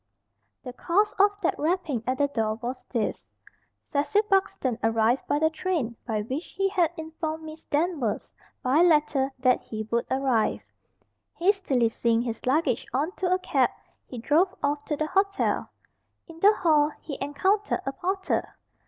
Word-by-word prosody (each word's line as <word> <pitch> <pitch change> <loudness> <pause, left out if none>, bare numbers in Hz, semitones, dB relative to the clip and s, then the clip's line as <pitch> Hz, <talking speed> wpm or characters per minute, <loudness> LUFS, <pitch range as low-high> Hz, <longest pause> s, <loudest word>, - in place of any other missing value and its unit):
The 250 -2 -7
cause 390 +10 +1
of 405 +1 +4
that 340 - 0
rapping 310 - -1
at 255 +1 0
the 285 - +2
door 220 -6 -1
was 240 +3 -4
this. 230 -4 -2 0.6
Cecil 300 +9 +1
Buxton 275 - +1
arrived 225 +3 +2
by 290 - +2
the 315 +1 +2
train 315 -8 -2
by 215 -3 -1
which 265 +9 -4
he 390 0 +2
had 360 -5 +2
informed 320 0 -5
Miss 315 0 -10
Danvers, 295 - -1 0.3
by 265 +6 +3
letter, 300 -5 +3
that 255 -1 +3
he 215 -1 -6
would 235 0 0
arrive. 260 -4 +1 0.7
Hastily 340 - +2
seeing 230 0 +1
his 230 0 -5
luggage 270 -2 +1
on 290 +7 0
to 365 -1 0
a 365 - +4
cab, 370 - +1 0.4
he 250 - -8
drove 335 +11 +2
off 290 0 0
to 295 - -2
the 310 - 0
hotel. 390 +4 0 0.6
In 330 -1 -12
the 405 +4 +7
hall 305 -5 +3
he 285 - -7
encountered 380 +9 0
a 270 - -1
porter. 380 +6 -2
295 Hz, 160 wpm, -26 LUFS, 250-360 Hz, 0.7 s, the